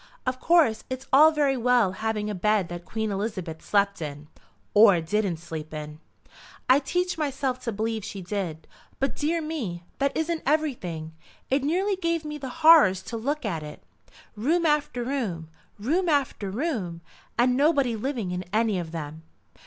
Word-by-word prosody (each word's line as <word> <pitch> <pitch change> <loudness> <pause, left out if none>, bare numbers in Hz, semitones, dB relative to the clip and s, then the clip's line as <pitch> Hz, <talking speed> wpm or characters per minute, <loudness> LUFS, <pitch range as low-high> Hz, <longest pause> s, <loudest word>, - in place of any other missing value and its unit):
Of 255 0 -1
course 320 -10 +3
it's 260 0 -5
all 300 +4 +9
very 290 -3 +2
well 245 -5 +3
having 210 +2 -2
a 210 - -2
bed 205 -1 +1
that 175 0 -7
Queen 220 +4 -3
Elizabeth 195 -6 -4
slept 200 -2 +1
in." 150 0 -6 0.4
"Or 205 -4 +7
didn't 185 +1 -1
sleep 160 -2 -7
in." 150 0 -7 0.7
"I'd 270 +2 +4
teach 360 -1 0
myself 270 -3 -1
to 230 - -1
believe 220 +1 -2
she 205 -1 -6
did. 175 -4 -4 0.3
But 275 - 0
dear 320 +2 0
me, 230 - -4 0.2
that 280 0 0
isn't 320 +1 -1
everything. 210 - -1 0.4
It 270 +1 +2
nearly 375 +7 +1
gave 335 -3 -1
me 300 0 -5
the 265 -2 -5 0.2
horrors 210 - +7
to 235 - -6
look 285 +5 -2
at 170 -7 -2
it. 150 0 -10 0.5
Room 320 +11 +1
after 295 -5 +1
room, 215 - -3 0.3
room 330 - 0
after 275 -9 0
room, 200 - -3 0.4
and 250 +1 +3
nobody 275 -4 +3
living 225 -4 -3
in 180 0 -3
any 215 -2 +1
of 165 -2 -6
them." 160 -1 -6
225 Hz, 165 wpm, -26 LUFS, 185-290 Hz, 0.7 s, all